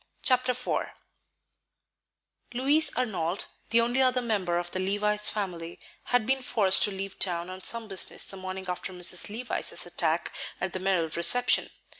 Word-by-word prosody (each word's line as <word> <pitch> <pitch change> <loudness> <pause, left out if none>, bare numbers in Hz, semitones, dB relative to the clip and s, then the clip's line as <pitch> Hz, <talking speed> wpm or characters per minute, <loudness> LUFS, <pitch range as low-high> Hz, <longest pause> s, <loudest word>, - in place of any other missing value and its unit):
Chapter 255 -1 +2
IV 250 +1 -2 1.7
Louis 285 +4 +4
Arnold, 190 -7 -1 0.2
the 230 +1 +4
only 240 +3 +1
other 255 -1 +3
member 195 -7 0
of 175 0 -2
the 185 - -3
Levice 210 +2 +1
family, 175 -5 -4 0.3
had 245 -3 +1
been 265 +2 +1
forced 200 -6 +3
to 205 - -3
leave 195 0 -6
town 175 -1 0
on 185 0 -8
some 230 -1 +2
business 195 -2 -3
the - - -2
morning 190 0 -6
after 180 +1 -4
Mrs. 180 +1 +1
Levice's 235 +4 -3
attack - - -1 0.3
at 190 - -3
the 185 - -3
Merrill 185 -4 +1
reception. 170 +11 +4
195 Hz, 155 wpm, -28 LUFS, 185-245 Hz, 1.7 s, Louis